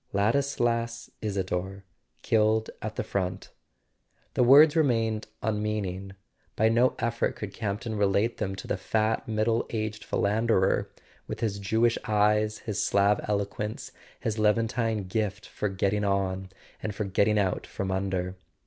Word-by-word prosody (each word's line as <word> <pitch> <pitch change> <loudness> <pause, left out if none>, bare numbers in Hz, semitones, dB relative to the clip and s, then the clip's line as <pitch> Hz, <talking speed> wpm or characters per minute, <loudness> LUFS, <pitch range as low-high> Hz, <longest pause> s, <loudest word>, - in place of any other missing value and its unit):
Ladislas 115 +1 0
Isador 95 -1 -3 0.4
killed 110 0 +2
at 110 0 -4
the - - -2
front! 95 -1 -3 0.8
The - - +1
words 145 +5 +8
re¬ 160 - +4
mained 115 -5 0 0.2
unmeaning; 105 -3 -2 0.4
by 110 +1 +3
no 120 +3 +3
effort 115 0 -1
could 100 -2 -6
Campton 110 +1 -3
relate 105 +3 +1
them 95 -3 -2
to - - -8
the - - -1
fat 110 +3 0
middle 110 +1 +1
aged 110 -1 -3
philanderer 105 -1 +1 0.4
with - - -5
his 100 -3 -1
Jewish 110 +4 +2
eyes, 105 0 +2
his 105 -3 -1
Slav 100 +1 +3
eloquence, 105 +1 -3 0.3
his 110 -1 -2
Levantine 110 0 +1
gift 105 +1 -2
for 105 - -3
getting 100 +2 0
on, 95 -1 0 0.3
and 105 -2 -4
for 105 - -2
getting 100 +2 +2
out 95 -3 0
from 95 -1 -3
under. 95 -1 -1
105 Hz, 140 wpm, -27 LUFS, 100-115 Hz, 0.8 s, words